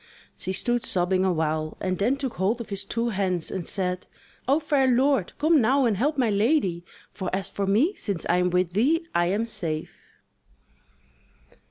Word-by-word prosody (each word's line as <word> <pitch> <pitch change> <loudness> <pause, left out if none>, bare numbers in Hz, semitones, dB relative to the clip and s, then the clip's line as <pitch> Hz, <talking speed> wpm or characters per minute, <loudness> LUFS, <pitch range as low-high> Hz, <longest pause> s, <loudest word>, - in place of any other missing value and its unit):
She 190 - -3
stood 240 +5 0
sobbing 185 -2 +1
awhile, 155 -3 -1
and 185 -1 -2
then 240 +7 +2
took 270 -3 -3
hold 200 +6 +1
of 235 - -7
his 200 -1 -1
two 230 +4 -2
hands 185 -5 -1
and 185 -3 -4
said: 180 -2 -3 0.4
"O 280 +4 +4
fair 290 -4 +2
lord, 260 -4 +2
come 310 -1 +4
now 265 +4 +3
and 225 -3 +2
help 290 +9 0
my 245 -5 +2
lady! 200 - +1 0.3
for 185 -3 -4
as 195 0 -3
for 200 -1 -2
me, 240 - +3
since 200 - -3
I 175 - +3
am 180 0 +2
with 180 -1 0
thee, 305 - +2
I 175 0 +2
am 205 +5 0
safe." 170 -9 -3
200 Hz, 180 wpm, -25 LUFS, 180-255 Hz, 0.4 s, O